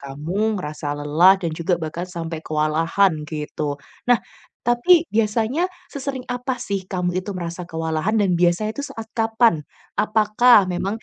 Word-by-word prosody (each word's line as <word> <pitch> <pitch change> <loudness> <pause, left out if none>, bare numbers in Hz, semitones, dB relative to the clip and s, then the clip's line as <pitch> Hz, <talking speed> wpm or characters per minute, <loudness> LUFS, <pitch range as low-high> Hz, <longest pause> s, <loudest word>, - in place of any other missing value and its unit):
kamu 175 +11 -2
ngerasa 150 -4 -4
lelah 155 +6 +5
dan 170 -4 -3
juga 170 +3 0
bahkan 165 +2 -5
sampai 165 -2 -5
kewalahan 160 +5 +1 0.2
gitu. 150 -1 -4 0.3
Nah, 245 - +7 0.5
tapi 240 +9 +4
biasanya 225 - +1 0.2
sesering 270 -2 -4
apa 250 +1 -2
sih 200 -6 -4
kamu 180 -1 -1
itu 190 +1 -5
merasa 175 0 -5
kewalahan 160 +4 -2
dan 195 -5 +2
biasanya 175 +5 +2
itu 285 - -2
saat 225 0 -8
kapan? 225 -8 +2 0.3
Apakah 215 -1 +4
memang 195 +5 -3
185 Hz, 140 wpm, -22 LUFS, 165-225 Hz, 0.5 s, Nah